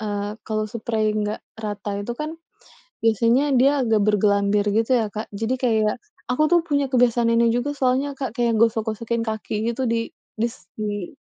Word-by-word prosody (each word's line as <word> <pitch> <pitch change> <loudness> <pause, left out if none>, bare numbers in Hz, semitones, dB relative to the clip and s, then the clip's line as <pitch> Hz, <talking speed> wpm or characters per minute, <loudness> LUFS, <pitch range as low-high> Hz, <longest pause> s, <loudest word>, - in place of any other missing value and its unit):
eee, 205 -1 -3
kalau 215 -1 -1
seprei 220 -1 0
nggak 210 0 -2 0.2
rata 205 -1 -4
itu 220 +4 -4
kan, 305 - -2 0.7
biasanya 230 +4 +3 0.2
dia 275 +2 +5
agak 220 -2 +2
bergelambir 205 0 +2
gitu 225 +3 +1
ya, 220 - 0
Kak. 215 +1 -4
Jadi 225 +5 -1
kayak 220 -3 +2 0.3
aku 250 +5 +1
tuh 345 - +6
punya 285 -2 +1
kebiasaan 240 -2 +3
ini 230 0 +4
juga 265 +4 -1
soalnya, 265 +2 +1
Kak. 265 -4 -4
Kayak 235 -1 +1
gosok-gosokin 230 0 0
kaki 220 -1 -4 0.2
gitu 260 - -5
di 230 0 -1 0.3
dis 230 +2 0 0.2
di 205 -3 -4
225 Hz, 165 wpm, -23 LUFS, 210-240 Hz, 0.7 s, tuh